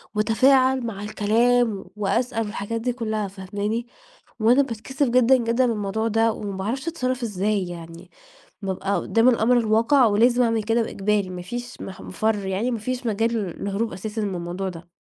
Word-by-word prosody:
واتفاعل 255 +4 +3
مع 205 -3 -5
الكلام 220 +1 +1
وأسأل 225 +3 0
والحاجات 215 +2 -4
دي 245 +1 -1
كلّها، 220 -4 -2
فاهماني؟ 205 +4 -4 0.5
وأنا 235 +5 +5
باتكسف 265 +2 -2
جدًا، 250 +1 +5
جدًا، 235 +1 +1
من 240 - +1
الموضوع 210 +1 -2
ده 225 +1 +2
وما 200 -3 -5
باعرفش 235 - -3
أتصرف 255 -6 -2
إزاي 205 -2 -1
يعني، 170 +1 -10 0.5
بابقى 195 0 -2
قدام 225 +7 +3
الأمر 245 0 +3
الواقع 230 +4 +4
ولازم 235 +4 +4
أعمل 230 -2 +1
كده 225 +2 +1
وإجباري 205 -2 -1
ما 180 -1 -6
فيش 245 +6 -7
مح 190 -1 -8
مفرّ 210 0 -1
يعني 195 +6 -1
ما 235 - -2
فيش 255 +3 -4
مجال 225 +1 0
للهروب 200 +1 -2
أساسًا 215 +3 -4
من 200 -3 -2
الموضوع 175 +2 -4
ده. 170 -1 -11
220 Hz, 165 wpm, -23 LUFS, 200-240 Hz, 0.5 s, وأنا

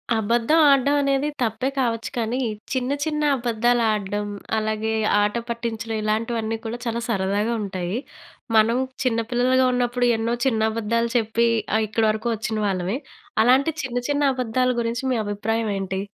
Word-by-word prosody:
అబద్ధం 230 +8 +2
ఆడడం 280 0 +4
అనేది 275 +1 +1
తప్పే 240 +3 0
కావచ్చు 230 -3 0
కానీ 235 +2 -1 0.3
చిన్న 260 0 -1
చిన్న 300 -1 -1
అబద్దాలు 240 0 +1
ఆడడం, 205 0 -2 0.3
అలాగే 215 0 -1 0.3
ఆట 205 +1 +1
పట్టించడం 230 -1 -3
ఇలాంటివన్నీ 225 +1 -1
కూడా 225 +2 -3
చాలా 235 0 -2
సరదాగా 205 +2 0
ఉంటయి. 190 0 -3 0.6
మనం 220 +2 +4 0.3
చిన్న 235 -3 +1
పిల్లలుగా 255 +1 +3
ఉన్నప్పుడు 245 0 +1
ఎన్నో 230 +2 0
చిన్న 220 -4 +2
అబద్దాలు 230 +1 -1
చెప్పి 230 +1 +1 0.3
ఆహ్, 220 - +1
ఇక్కడి 220 +2 +1
వరకు 220 +2 -3
ఒచ్చిన 220 0 -3
వాళ్ళమే, 190 +3 -1 0.5
అలాంటి 265 +6 +4
చిన్న 250 -2 -3
చిన్న 290 0 +1
అబద్ధాల 255 0 0
గురించి 230 +1 -2
మీ 245 - +1
అభిప్రాయం 215 +2 -1
ఏంటి? 190 0 -3
230 Hz, 145 wpm, -23 LUFS, 215-245 Hz, 0.6 s, ఆడడం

